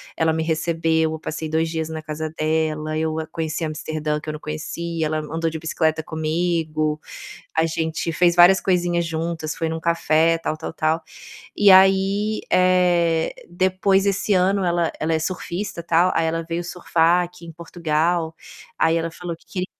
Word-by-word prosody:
ela 160 0 +2
me 160 0 -1
recebeu, 160 0 0
eu 160 - -5
passei 160 0 -5
2 160 +1 +1
dias 160 -1 -3
na 160 0 -5
casa 155 0 -5
dela, 155 0 0
eu, 160 0 -1
hã, 160 - -5
conheci 160 0 -2
Amsterdã 155 0 -3
que 155 - -7
eu - - -3
não 150 - -7
conhecia, 160 +2 -4
ela 155 +1 -1
andou 160 +2 -2
de 160 0 -6
bicicleta 160 0 0
comigo, 155 -1 -1 0.5
a 160 - +2
gente 160 0 -2
fez 175 +1 +3
várias 180 +2 +7
coisinhas 175 -2 +1
juntas, 160 -1 -3
foi 165 - -2
em - - -3
um 160 - -3
café, 165 0 +2
tal, 160 -1 -3
tal, 155 - -6
tal. 160 0 0 0.6
E 205 -1 +6
aí, 195 +3 +4
eh, 175 -3 +3 0.2
depois, 185 +2 +2
esse 200 +1 +1
ano 190 +1 +2
ela 170 -2 +1
ela 160 +1 0
é - - +2
surfista 175 +2 -4
tal, 170 +2 +3
aí 165 - +2
ela 165 +1 -1
veio 170 +1 -2
surfar 170 0 +2
aqui 175 0 -12
em 165 - -9
Portugal, 165 0 -1 0.4
aí 160 0 +3
ela 165 0 -1
falou 170 0 -6
que - - -27
queria 180 +2 -4
165 Hz, 180 wpm, -22 LUFS, 160-175 Hz, 0.6 s, várias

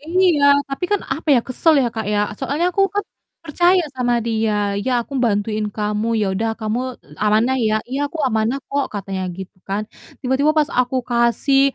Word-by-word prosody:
Iya, 335 -1 +2 0.3
tapi 275 +5 -3
kan 410 - +2
apa 315 +1 -9
ya, 245 - +4
kesel 310 +5 +3
ya, - - +1
Kak, 220 -2 -3
ya, 205 - +1 0.2
soalnya 285 +6 -1
aku 390 - +2
kan 410 - 0 0.4
percaya 350 +3 +3
sama 245 -1 +1
dia, 210 -3 0
"Ya 260 - +1
aku 275 - -16
bantuin 210 0 0
kamu 210 +1 -1
ya 205 - +1
udah 225 +3 -1
kamu 215 +2 -1 0.4
amanah 220 +5 +2
ya?" 215 -2 +1 0.2
"Iya 285 +2 -1
aku 320 - -9
amanah 225 +2 0
kok," 280 0 0
katanya 195 -1 -4 0.2
gitu 190 -1 -9
kan. 200 +2 -1 0.4
Tiba-tiba 275 +4 +2
pas 300 - +2
aku 250 +1 0
kasih 235 +4 +3
245 Hz, 180 wpm, -20 LUFS, 215-285 Hz, 0.4 s, ya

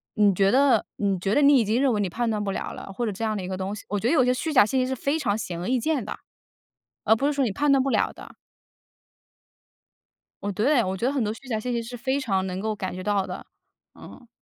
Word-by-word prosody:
你 205 -2 +4
觉 195 +1 +3
得 260 -1 +4
你 195 -2 -1
觉 195 +3 0
得 290 - +4
你 280 0 +7
已 230 - +1
经 220 +4 +1
认 275 -2 +3
为 210 - 0
你 195 - -1
判 235 +6 -1
断 210 -1 -1
不 200 - -2
了 - - -4
了， - - -9
或 235 +5 -3
者 215 - -1
这 200 +3 -6
样 215 -1 0
的 190 - -4
一 - - -5
个 190 - -3
东 190 +2 -3
西。 210 - -11
我 205 - -1
觉 225 - -1
得 255 - +2
有 255 -6 +4
些 250 - +3
虚 315 +5 -3
假 260 -8 +6
信 260 +5 0
息 255 - 0
是 265 - -2
非 280 +5 -1
常 215 -8 0
显 180 -6 -5
而 175 - -4
易 255 0 +1
见 305 +2 0
的， - - -6 0.9
而 220 - +5
不 275 +5 0
是 295 - +1
说 280 -1 +1
你 225 - -1
判 290 +9 +1
断 270 -1 +4
不 275 - -1
了 - - +1
的。 - - -13 2.1
我 205 - -1
对， 240 +6 +2
我 190 -1 -3
觉 230 - -2
得 265 - +1
很 270 -4 0
多 210 - -1
虚 230 +4 -11
假 225 -4 -1
信 250 +3 -3
息 235 -1 -1
是 240 +2 -8
非 265 +3 -1
常 195 -8 0
能 185 0 -4
够 215 +2 -2
感 190 -2 -4
觉 185 - -6
到 205 -1 +1
的， - - -7 0.5
嗯。 245 - -14
225 Hz, 310 characters per minute, -25 LUFS, 200-260 Hz, 2.1 s, 你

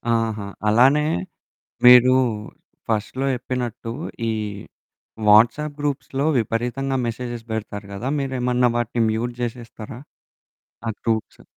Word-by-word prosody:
ఆహా! 110 -3 -1 0.2
అలానే 135 +7 +5 0.8
మీరూ 125 +1 +9 0.8
ఫస్ట్‌లో 115 +5 -1
చెప్పినట్టూ, 120 -2 -4 0.4
ఈ - - 0 1.0
వాట్సాప్ 125 +8 +5
గ్రూప్స్‌లో 140 0 -2
విపరీతంగా 125 +4 -1
మెసేజెస్ 120 0 -5
బెడతారు 105 -2 -5
గదా! 120 +7 -3
మీరేమన్నా 125 -2 +1
వాటిని 120 0 0
మ్యూట్ 120 +2 -2
జేసేస్తారా? 115 -1 -6 0.9
ఆ - - +1
గ్రూప్స్. 110 -2 -2
120 Hz, 95 wpm, -22 LUFS, 115-130 Hz, 1.0 s, మీరూ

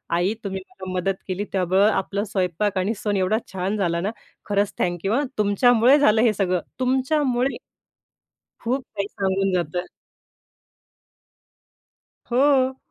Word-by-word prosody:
आई 180 +4 +1
तुम्ही 190 -2 -4
मला 185 -1 -8
मदत 185 +1 0
केली, 190 +1 -2
त्यामुळं 190 +2 +3
आपलं 200 +1 -1
स्वयंपाक 195 -1 -1
आणि 190 +4 +1
सन 205 -1 -1
एवढा 190 +3 +2 0.2
छान 190 +3 -2
झाला 170 -4 0
ना? 200 +4 -1 0.4
खरंच 205 0 +1
थँक्यू 175 +3 -1
हां, 280 +5 +2
तुमच्यामुळे 235 +5 +4
झालं 220 -5 +4
हे 230 -2 +4
सगळं. 185 -3 0 0.2
तुमच्यामुळे 260 0 +1 1.0
खूप 255 +3 -1
काही 200 -1 -2
सांगून 195 0 0
जातं. 175 0 -1 2.4
हो. 265 0 +3
200 Hz, 125 wpm, -23 LUFS, 185-240 Hz, 2.4 s, तुमच्यामुळे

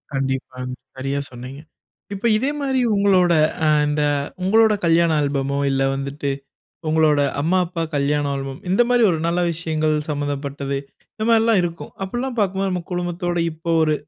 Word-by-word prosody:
கண்டிப்பாங்க. 130 -1 -3 0.2
சரியா 135 +2 -2
சொன்னீங்க. 125 +3 -9 0.5
இப்ப 200 +3 -5
இதே 260 +6 0
மாரி 265 -2 0 0.2
உங்களோட 190 -3 +4 0.3
அ - - +3 0.2
இந்த 150 0 0 0.4
உங்களோட 220 +3 +4
கல்யாண 165 0 +4
ஆல்பமோ, 140 -1 -1
இல்ல 135 0 +1
வந்துட்டு 140 +1 -3 0.6
உங்களோட 155 -2 +3 0.2
அம்மா, 165 +6 +2
அப்பா 170 -1 -4
கல்யாண 145 +1 +1
ஆல்பம், 135 0 -5
இந்த 195 +6 +4
மாரி 245 -1 +3
ஒரு 165 - 0
நல்ல 170 +1 +1
விஷயங்கள் 155 -1 -1 0.2
சம்மந்தப்பட்டது. 140 -1 -3 0.4
இந்த 215 - -3
மாரிலாம் 225 -3 +4
இருக்கும் 170 -1 -5
அப்படிலாம் 240 +6 -3
பாக்கும்போது 195 -1 +1
நம்ம 180 -1 -2
குடும்பத்தோட 175 0 -2
இப்ப 160 +1 -19 0.2
ஒரு 155 -1 +2
160 Hz, 145 wpm, -21 LUFS, 140-190 Hz, 0.6 s, உங்களோட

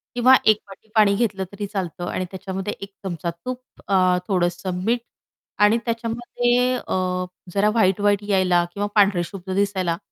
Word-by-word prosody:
किंवा 255 +2 +6
1 215 -1 +6
वाटी 195 +3 -14
पाणी 210 -2 +5
घेतलं 200 -4 0
तरी 205 0 -5
चालतं. 180 -4 -4
आणि 185 - -2
त्याच्यामध्ये 190 +1 -4
1 200 - -7
चमचा 170 -2 -3
तूप 245 +10 -6 0.3
अ 185 -2 +4
थोडंसं 180 -1 -1
मीठ. 235 +2 +2 0.6
आणि 210 +2 +5
त्याच्यामध्ये 240 +2 0
अ, 185 -5 -2 0.3
जरा 205 +1 +3
व्हाईट-व्हाईट 205 -1 +2
यायला 185 -3 +3
किंवा 205 0 -2
पांढरेशुभ्र 190 -2 +1
दिसायला, 190 -4 0
200 Hz, 140 wpm, -22 LUFS, 185-215 Hz, 0.6 s, किंवा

